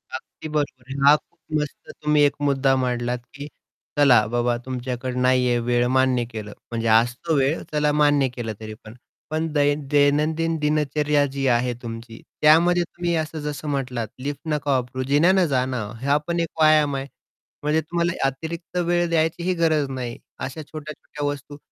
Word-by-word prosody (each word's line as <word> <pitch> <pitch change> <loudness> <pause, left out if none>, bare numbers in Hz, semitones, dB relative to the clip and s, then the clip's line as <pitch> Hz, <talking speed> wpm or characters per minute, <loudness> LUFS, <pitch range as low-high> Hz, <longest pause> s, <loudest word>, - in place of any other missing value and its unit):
अगदी 155 - -9
बरोबर 145 -4 -2
आहे. 135 - -4
हा 150 - +8
खूप 170 +2 -11 0.2
मस्त 150 - -7
तुम्ही 150 0 +3
एक 145 - +3
मुद्दा 135 -2 +2
मांडलात, 125 -1 -1
की 140 +1 -7 0.5
चला 125 -7 +6
बाबा 120 +1 0
तुमच्याकडं 125 0 -3
नाहीये 125 -1 +3
वेळ, 120 +1 +1
मान्य 130 -2 +3
केलं. 105 -2 -7 0.2
म्हणजे 115 -1 -2
असतो 120 +8 +2
वेळ, 140 +4 +1
चला 150 -1 +2
मान्य 145 -2 +4
केलं 115 -3 -4
तरी 110 -1 -7
पण. 110 0 -11 0.4
पण 160 +1 -1
दै 145 -1 +3 0.2
दैनंदिन 155 +3 +2
दिनचर्या 150 -1 +1
जी 135 -1 -2
आहे 125 0 +2
तुमची. 115 -1 -8 0.2
त्यामध्ये 170 +3 +5
तुम्ही 175 0 -3
असं 155 0 -3
जसं 150 0 -5
म्हटलात 125 -5 -2
लिफ्ट 140 +2 -4
नका 145 -1 -1
वापरू, 130 0 -1
जिन्याने 175 +5 +4
जा 130 -3 +1
ना. 130 -3 -3 0.2
हा 140 +2 +3
पण 170 0 -1
एक 165 -1 -1
व्यायाम 155 -2 +5
आहे. 135 0 -4 0.6
म्हणजे 150 +2 +2
तुम्हाला 170 +2 -1 0.2
अतिरिक्त 165 +6 -6
वेळ 175 0 +2
द्यायचीही 170 +2 +1
गरज 155 -4 +2
नाही. 125 -3 -5 0.2
अशा 140 +4 -5
छोट्या-छोट्या 150 -1 -7
वस्तू 145 0 -5
145 Hz, 165 wpm, -23 LUFS, 125-155 Hz, 0.6 s, हा